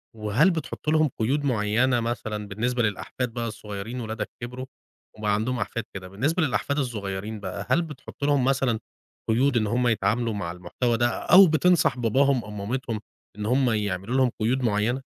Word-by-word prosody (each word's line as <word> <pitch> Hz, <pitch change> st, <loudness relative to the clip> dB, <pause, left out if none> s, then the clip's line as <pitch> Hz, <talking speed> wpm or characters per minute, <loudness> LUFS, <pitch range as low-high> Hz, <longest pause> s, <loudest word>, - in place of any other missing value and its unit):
وهل 110 Hz, -, +3 dB
بتحط 155 Hz, -2 st, -4 dB
لهم 155 Hz, -1 st, +4 dB
قيود 140 Hz, +6 st, +1 dB
معيّنة 120 Hz, +1 st, +2 dB
مثلًا 110 Hz, -2 st, -3 dB
بالنسبة 120 Hz, +4 st, -1 dB
للأحفاد 115 Hz, +4 st, -2 dB
بقى 120 Hz, -1 st, -2 dB
الصغيّرين 105 Hz, +3 st, -6 dB
ولادك 110 Hz, 0 st, -4 dB
كبروا، 125 Hz, +2 st, -6 dB, 0.5 s
وبقى 105 Hz, -1 st, 0 dB
عندهم 120 Hz, +4 st, 0 dB
أحفاد 115 Hz, -, -3 dB
كده، 95 Hz, -1 st, -7 dB
بالنسبة 145 Hz, -, 0 dB
للأحفاد 140 Hz, +1 st, 0 dB
الصغيّرين 105 Hz, -4 st, -3 dB
بقى 100 Hz, 0 st, -5 dB
هل 170 Hz, -, +4 dB
بتحط 150 Hz, -3 st, -9 dB
لهم 145 Hz, -3 st, +3 dB
مثلًا 130 Hz, -4 st, +1 dB, 0.5 s
قيود 125 Hz, +3 st, +3 dB
إن 110 Hz, -2 st, +1 dB
هُم 120 Hz, +3 st, +1 dB
يتعاملوا 110 Hz, +1 st, +1 dB
مع 85 Hz, -5 st, -3 dB
المحتوى 115 Hz, +7 st, -1 dB
ده، 120 Hz, +1 st, +3 dB
أو 185 Hz, 0 st, +6 dB
بتنصح 155 Hz, -4 st, +3 dB
باباهم 130 Hz, +2 st, +2 dB
أو 105 Hz, -, -10 dB
مامتهم 110 Hz, +2 st, -3 dB, 0.4 s
إن 105 Hz, -, -4 dB
هُم 125 Hz, +2 st, +3 dB
يعملوا 105 Hz, +1 st, -1 dB
لهم 130 Hz, -3 st, +3 dB
قيود 125 Hz, +4 st, +1 dB
معيّنة؟ 115 Hz, +3 st, +1 dB
120 Hz, 165 wpm, -25 LUFS, 105-130 Hz, 0.5 s, أو